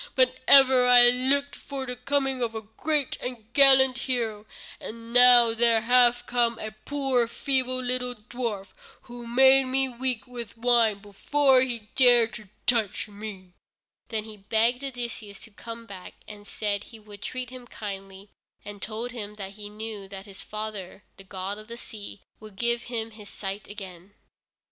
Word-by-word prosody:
But 255 0 +2
ever 260 -2 +6
I 245 -1 +8
looked 275 +3 +1
for 275 -2 -7
the 250 -1 -5
coming 270 0 -1
of 230 -2 -2
a 220 - -5
great 285 +6 -2
and 245 -3 -6
gallant 265 -2 +5
hero, 225 -5 -3 0.3
and 230 +1 -9
now 245 -2 +7
there 230 -1 +3
hath 245 +1 +4
come 235 -2 +1
a 215 -1 -6
poor 255 +2 -1
feeble, 255 +1 -1
little 250 0 -2
dwarf, 215 -3 -5 0.3
who 240 -1 -10
made 265 +2 +5
me 265 +1 +3
weak 250 -1 -1
with 235 -3 -9
wine 230 -3 +3
before 265 +6 +2
he 235 -5 -3
dared 240 -3 +5
to 210 -2 -10 0.2
touch 225 -5 0
me." 200 -3 -10 0.5
Then 220 -2 -3
he 215 -1 -10
begged 230 +5 +1
Odysseus 235 -6 -5
to 225 - -13
come 230 +2 -9
back, 195 -4 -11
and 205 -1 -12
said 205 -1 -3
he 230 - -13
would 210 -2 -14
treat 255 +1 -5
him 255 -1 -11
kindly, 195 -2 -9 0.4
and 205 -1 -10
told 230 +3 -5
him 210 -3 -7
that 195 -2 -7
he 205 0 -9
knew 210 -1 -7
that 195 0 -9
his 195 -2 -11
own - - -16
father, 210 -3 -7
the 195 - -13
god 190 +2 -6
of 215 - -13
the 235 0 -9
sea, 205 -4 -10 0.2
would 215 -2 -13
give 235 +3 -1
him 225 -2 -4
his 210 -2 -13
sight 195 +1 -7
again. 195 -1 -11
230 Hz, 170 wpm, -26 LUFS, 210-250 Hz, 0.5 s, I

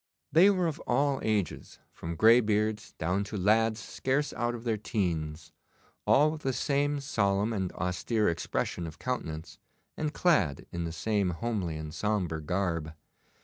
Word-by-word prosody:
They 170 +7 +7
were 185 -3 +2
of 160 -1 -2
all 140 +2 +2
ages, 105 -6 -2
from 85 0 -6
greybeards 110 0 +3
down 90 +5 0
to 105 +1 -5
lads 110 +3 +3
scarce 135 +6 -1
out 120 0 -1
of 115 - -8
their 115 -2 +1
teens, 85 -7 -2 0.6
all 150 +2 +5
with 155 -1 -7
the 135 -2 -1
same 145 +2 0
solemn 105 -5 +1
and 95 -4 -2
austere 90 +5 0
expression 85 0 -2
of 80 - -9
countenance, 80 -11 -4 0.4
and 155 -1 -2
clad 105 - +2
in 85 -1 -3
the 85 - -3
same 100 +2 0
homely 90 -2 -2
and 75 0 -6
sombre 90 -5 -1
garb. 85 -2 -2
105 Hz, 150 wpm, -29 LUFS, 85-125 Hz, 0.6 s, They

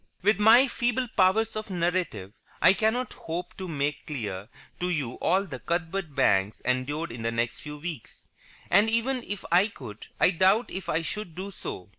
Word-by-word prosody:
With 205 +1 +3
my 230 +5 +7
feeble 245 +1 0
powers 220 +5 +3
of 215 0 -4
narrative, 175 - -1 0.3
I - - +6
cannot 225 +5 0
hope 170 +2 -6
to 190 - -5
make 145 -2 -2
clear 105 -8 -5 0.3
to 180 - -1
you 145 -9 -1
all 190 +2 +3
that 130 - -9
Cuthbert 170 -2 -2
Banks 100 -6 +2
endured 130 +5 -1
in 115 0 -7
the 115 0 -1
next 115 0 -1
few 150 0 -8
weeks. 155 -5 -8 0.5
And, 205 +5 +5
even 245 +3 0
if 205 -4 -6
I 180 +4 +5
could, 120 - -10
I 180 - +5
doubt 190 +6 +3
if 190 -1 -6
I 160 +1 +1
should 185 -2 -5
do 195 +2 -5
so. 95 - -7
175 Hz, 180 wpm, -27 LUFS, 140-205 Hz, 0.5 s, my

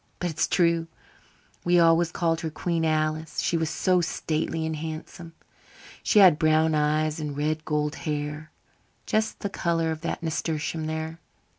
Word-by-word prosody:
But 175 -1 -2
it 155 - -11
is - - +3
true. 170 -2 +2 0.8
We 175 0 +4
always 165 0 +4
called 165 -1 0
her 160 - -2
Queen 165 +1 -2
Alice 155 0 -1
she - - 0
was 160 -2 0
so 185 +1 +2
stately 160 0 -2
and 160 0 -2
handsome. 160 +2 -7 0.7
She - - +1
had 180 -6 +7
brown 155 0 +3
eyes 155 +1 +1
and 150 -2 -4
red 155 +1 -1
gold 150 -1 0
hair, 150 0 -4 0.5
just 220 0 -1
the 205 - -1
colour 165 -3 0
of 160 0 -5
that 170 - -4
nasturtium 160 -1 -2
there. 160 +1 -4
160 Hz, 160 wpm, -26 LUFS, 155-165 Hz, 0.8 s, had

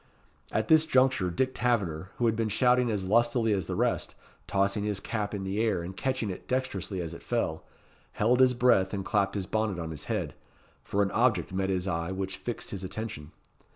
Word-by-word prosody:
At 110 0 0
this 160 0 +5
juncture, 130 - +3
Dick 130 +10 0
Taverner, 95 -8 0
who 120 - +1
had 115 -1 +3
been 110 -1 0
shouting 125 +3 +3
as 100 -4 -1
lustily 115 +2 +3
as 95 -4 -1
the - - -2
rest, - - 0 0.3
tossing 100 +1 +1
his 105 -2 -1
cap 105 0 -3
in 100 -2 -4
the 95 +3 -1
air, 105 -7 +1
and 95 +2 -7
catching 115 +1 -1
it 90 - -9
dexterously 105 -7 -2
as 85 -1 -4
it - - -9
fell, 115 -10 -2 0.5
held 120 +4 +2
his 130 -1 +5
breath 105 -6 +3
and 95 -1 -4
clapped 100 -1 +1
his 100 -2 -1
bonnet 110 -1 -1
on 80 -2 -4
his 75 - -5
head, - - -2 0.5
for 100 0 +1
an 100 - -1
object 110 -7 +1
met 95 0 0
his 95 0 -1
eye 85 -1 -2
which 95 0 -3
fixed 120 - -5
his 95 -2 -5
attention. 100 -6 -6
100 Hz, 205 wpm, -28 LUFS, 95-120 Hz, 0.5 s, this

